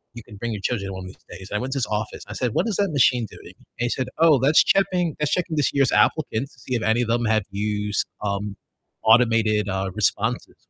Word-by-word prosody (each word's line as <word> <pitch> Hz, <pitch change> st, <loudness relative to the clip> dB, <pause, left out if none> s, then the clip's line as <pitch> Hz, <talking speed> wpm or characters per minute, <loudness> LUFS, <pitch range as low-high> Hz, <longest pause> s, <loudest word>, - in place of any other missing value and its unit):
you 120 Hz, -, -7 dB
can 105 Hz, -, -13 dB
bring 120 Hz, +3 st, -4 dB
your 105 Hz, -, -5 dB
children 100 Hz, -6 st, -1 dB
along 95 Hz, 0 st, -7 dB
these 95 Hz, -, -12 dB, 0.2 s
days- 95 Hz, -, -10 dB
and 105 Hz, -, 0 dB
I -, -, -2 dB
went 130 Hz, +3 st, -3 dB
to -, -, -3 dB
his 125 Hz, -, -1 dB
office, 105 Hz, 0 st, -4 dB
and -, -, -22 dB
I -, -, -5 dB
said, 125 Hz, -4 st, -1 dB
"What -, -, +1 dB
is 220 Hz, -, -1 dB
that 200 Hz, -2 st, +1 dB
machine 125 Hz, -4 st, +3 dB
doing?" -, -, -13 dB
And -, -, -24 dB, 0.2 s
he -, -, -2 dB
said, 130 Hz, +1 st, -2 dB
"Oh, 160 Hz, -4 st, +6 dB
that's 145 Hz, +4 st, +5 dB
checking 180 Hz, -4 st, +1 dB
that's 150 Hz, -1 st, 0 dB
checking 175 Hz, -3 st, -1 dB
this 145 Hz, -, +2 dB
year's 135 Hz, -3 st, +2 dB
applicants 140 Hz, -4 st, +1 dB
to -, -, -21 dB
see 125 Hz, +1 st, -4 dB
if 115 Hz, -, -2 dB
any 110 Hz, +2 st, +2 dB
of 120 Hz, -, -1 dB
them 120 Hz, +1 st, +1 dB
have 110 Hz, -1 st, +2 dB
used, 105 Hz, +1 st, -2 dB, 0.2 s
um, 100 Hz, 0 st, -3 dB, 0.5 s
automated, 110 Hz, -2 st, +4 dB
uh, 95 Hz, 0 st, -2 dB
responses," -, -, -1 dB
115 Hz, 250 wpm, -23 LUFS, 105-140 Hz, 0.5 s, Oh